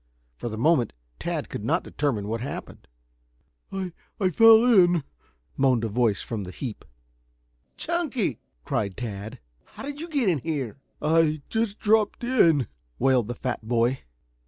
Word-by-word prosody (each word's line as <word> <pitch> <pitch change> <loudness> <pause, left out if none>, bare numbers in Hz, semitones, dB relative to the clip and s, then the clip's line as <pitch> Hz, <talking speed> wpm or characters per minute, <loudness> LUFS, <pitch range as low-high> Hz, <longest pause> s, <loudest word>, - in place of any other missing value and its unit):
For 120 - -5
the 110 - -5
moment 125 -2 +2 0.3
Tad - - -3
could - - -6
not - - +1
determine 125 -9 -2
what 115 +1 -2
had 130 - -3
happened. - - -9 0.8
"I 190 -3 -4 0.3
I 185 -3 +2
fell 225 +4 +7
in," 180 - +5 0.5
moaned 130 -4 +3
a 115 - -1
voice 110 -2 +1
from 110 -4 -4
the 90 - -7
heap. 110 +3 -6 0.9
"Chunky!" 285 - -1 0.3
cried 100 -3 -2
Tad. 110 0 -5 0.3
"How - - -12
did 285 +1 -6
you 335 - -6
get 280 -8 +1
in 170 -6 +2
here?" 140 -5 -3 0.2
"I 155 -1 +3
just 220 -2 -1
dropped 215 +1 +2
in," 170 - +4 0.3
wailed 130 -4 +3
the 120 - -4
fat 120 -3 -4
boy. 120 +2 +2
145 Hz, 155 wpm, -26 LUFS, -, 0.9 s, fell